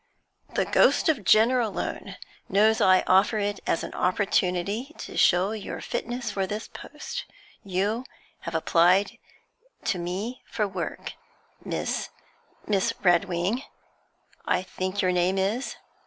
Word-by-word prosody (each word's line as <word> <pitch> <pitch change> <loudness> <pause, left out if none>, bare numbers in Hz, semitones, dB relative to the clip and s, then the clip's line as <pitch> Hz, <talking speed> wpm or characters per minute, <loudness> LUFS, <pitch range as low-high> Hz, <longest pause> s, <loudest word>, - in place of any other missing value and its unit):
'The - - +2
ghost - - +4
of 275 -10 +1
Jenner 225 +6 +5
alone 220 -5 -3 0.3
knows 215 +3 +4
I 185 -1 +5
offer 195 +4 +4
it 205 -1 -1
as - - +1
an - - -6
opportunity 195 - 0
to - - -8
show 185 +3 +4
your 215 -3 -5
fitness 240 -1 -3
for 195 -2 -1
this 210 +3 -4
post. - - -7 0.4
You 205 +6 -1 0.3
have 170 - -6
applied 175 +4 +3 0.7
to 185 - 0
me 195 +9 -4
for 215 -3 -1
work, 185 -4 -5 0.5
Miss - - -2 0.6
Miss 195 -3 +1
Redwing, 175 +5 +2 0.9
I - - +2
think 185 +1 -3
your 185 - +3
name 180 +1 +1
is?' 210 +8 -1
195 Hz, 125 wpm, -26 LUFS, 185-220 Hz, 0.9 s, Jenner